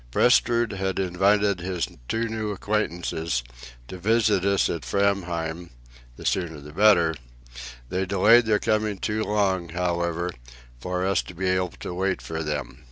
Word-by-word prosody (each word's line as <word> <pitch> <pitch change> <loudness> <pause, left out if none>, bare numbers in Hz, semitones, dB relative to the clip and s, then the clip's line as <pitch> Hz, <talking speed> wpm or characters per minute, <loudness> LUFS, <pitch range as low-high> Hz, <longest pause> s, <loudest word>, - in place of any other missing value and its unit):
Prestrud 120 - +3
had 95 -1 -2
invited 95 +1 +2
his 90 -1 -2 0.2
two 115 +1 -1
new 110 -1 -3
acquaintances 85 - -2 0.4
to 90 - -8
visit 105 -1 +2
us 100 0 +2
at 85 - -3
Framheim, 90 -4 -1 0.5
the - - -10
sooner 80 -4 -1
the 75 +1 -12
better; 85 -4 +5 0.8
they 95 +1 -1
delayed 110 +5 +5
their 105 -1 +4
coming 110 -1 0
too 110 +3 -1
long, 95 -5 0
however, 85 0 -1 0.5
for 90 +7 -2
us 95 0 +2
to 90 - -12
be 95 +3 -3
able 95 -1 +1
to - - -5
wait 95 +2 -1
for 80 0 -5
them. 75 -2 -4
95 Hz, 150 wpm, -25 LUFS, 85-105 Hz, 0.8 s, better